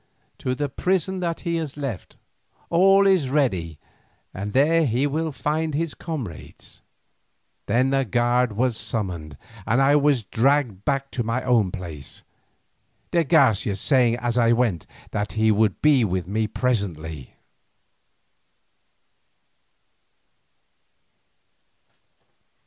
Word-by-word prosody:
"To 130 0 -2
the 145 +2 -2
prison 185 +5 -1
that 170 -2 -3
he 170 -2 -2
has 155 -4 -5
left. 135 -9 -6 0.5
All 195 +3 +5
is 185 -9 +3
ready 95 - 0 0.6
and 100 +2 -5
there 160 +6 +3
he 125 +4 +1
will 155 +3 -1
find 155 +2 -2
his 165 0 -2
comrades." 135 - -8 0.9
Then 125 +5 +2
a 135 0 +2
guard 120 0 +1
was 120 +2 0
summoned 90 -10 -4 0.3
and 120 +4 +2
I 135 +2 +4
was 145 -4 +2
dragged 120 -2 0
back 135 0 -1
to 125 - -3
my 115 +3 -2
own 115 -6 +2
place, 80 -6 -8 0.9
de 170 - +2
Garcia 115 -8 +3
saying 120 +2 +3
as 120 0 -1
I 115 0 +4
went 115 -9 0 0.2
that 105 -2 -3
he 110 +1 +2
would 105 -1 +1
be 145 -5 +5
with 95 -4 -2
me 110 +3 -1
presently. 85 - -3
125 Hz, 115 wpm, -23 LUFS, 105-145 Hz, 0.9 s, All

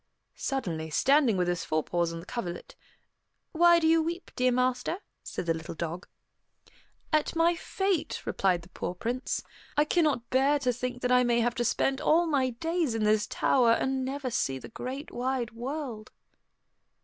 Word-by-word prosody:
Suddenly, 170 -13 -3
standing 265 - +3
with 180 -1 +1
his 175 -1 -1
forepaws 165 +2 0
on 165 - -6
the - - -13
coverlet, 180 -6 -5 0.8
"Why 345 +1 +6
do 330 - +1
you 325 0 +5
weep, 340 +3 -4
dear 255 0 +3
master?" 250 +5 0 0.2
said - - -5
the 165 - +2
little 160 0 -7
dog. 170 +2 -5 1.1
"At 305 +1 +2
my 335 +1 +4
fate," 385 0 -2
replied 180 -3 +1
the 170 - -15
poor 180 - -5
Prince. 245 +7 -2 0.3
"I 295 - +5
cannot 300 -8 +1
bear 275 +3 +4
to 255 -3 0
think 250 +1 -4
that 250 - +1
I 250 0 +5
may 240 -1 +2
have 240 +1 +1
to 240 -1 -1
spend 270 +3 +1
all 335 +3 +4
my 275 -5 +1
days 325 +1 -1
in 225 - 0
this 210 0 +3
tower, 240 -3 +3
and 265 +2 0
never 265 0 -3
see 135 - 0
the - - -10
great 260 +5 -6
wide 250 -1 -2
world." 240 -2 -5
250 Hz, 175 wpm, -28 LUFS, 215-290 Hz, 1.1 s, Why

